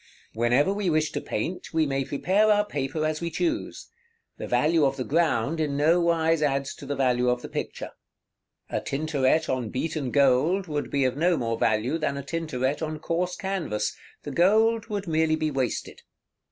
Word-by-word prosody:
Whenever 120 - +2
we 200 -2 -1
wish 155 -1 +1
to - - -3
paint, 165 +13 -4
we 160 -1 +3
may 135 -1 -1
prepare 190 +10 +1
our 210 0 +3
paper 150 -3 -2
as 155 +1 -2
we 170 - -2
choose; 325 - -3 0.5
the - - -5
value 160 0 +2
of 135 -1 +1
the 130 - -2
ground 150 -1 +1
in 145 -3 -1
no 160 +4 +4
wise 165 -1 +2
adds 140 -2 0
to - - -11
the 145 - -2
value 125 -2 +2
of 125 0 -1
the - - -5
picture. - - -5 0.8
A - - -1
Tintoret 145 0 0
on 125 -4 -2
beaten 145 +1 -2
gold 140 +8 +3
would 150 -4 -3
be 140 -2 +1
of 130 - 0
no 170 +2 +2
more 115 -1 -1
value 115 +8 +1
than 140 -3 -1
a 140 - -5
Tintoret 145 -3 -2
on 155 -1 -3
coarse 175 +3 -2
canvas; 190 - -2 0.3
the - - -5
gold 220 +5 +3
would 205 -3 -4
merely 160 -1 +2
be 155 -1 -1
wasted. 130 -4 -3
155 Hz, 185 wpm, -26 LUFS, 135-170 Hz, 0.8 s, no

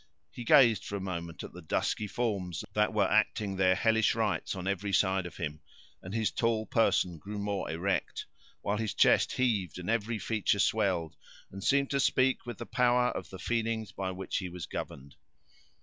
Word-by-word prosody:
He 120 - -7
gazed 115 -4 +6
for 100 - -5
a - - -2
moment 85 -4 -5
at - - -9
the 90 - -10
dusky 105 +6 -1
forms 100 -7 -2
that 105 +1 +2
were 105 -3 +2
acting 105 -2 +1
their 95 -1 +3
hellish 110 +1 +2
rites 105 -6 -1
on 95 0 -5
every 100 +1 -1
side 95 -1 +2
of 85 - -12
him, 75 +1 -4 0.4
and 90 - -8
his 110 0 0
tall 115 -2 0
person 90 -7 +1
grew 105 +7 -7
more 100 -1 -2
erect 90 +2 -2 0.4
while 100 +1 0
his 110 -3 -2
chest - - +4
heaved, 105 -10 0
and 90 +4 -3
every 115 0 0
feature 105 -2 0
swelled, 95 -6 +1 0.4
and 95 0 -8
seemed 140 0 +2
to 140 - +1
speak 130 -1 +2
with 120 -4 -5
the 120 - -6
power 125 0 +3
of - - -5
the 95 - -8
feelings 115 -1 -2
by 95 0 -4
which 95 0 -3
he 95 -2 -3
was 90 -1 -6
governed. 70 +1 -7
100 Hz, 190 wpm, -30 LUFS, 90-115 Hz, 0.4 s, gazed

